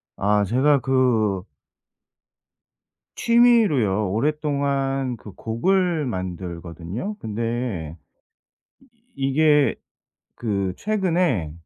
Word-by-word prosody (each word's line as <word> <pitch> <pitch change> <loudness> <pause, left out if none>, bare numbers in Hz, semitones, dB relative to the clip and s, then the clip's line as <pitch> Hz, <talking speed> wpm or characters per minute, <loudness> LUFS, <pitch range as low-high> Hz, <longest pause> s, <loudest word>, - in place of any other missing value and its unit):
아 105 +1 +2
제가 135 +7 +3
그 120 -8 +1 1.7
취미로요 205 - +3
오랫동안 140 0 -1
그 105 - -11
곡을 170 +7 0
만들거든요. 90 - -5
근데 110 -7 -3 0.9
이 270 - -22 0.4
이게 150 0 +3 0.6
그 100 -5 -2
최근에 175 - 0
125 Hz, 150 characters per minute, -23 LUFS, 100-150 Hz, 1.7 s, 제가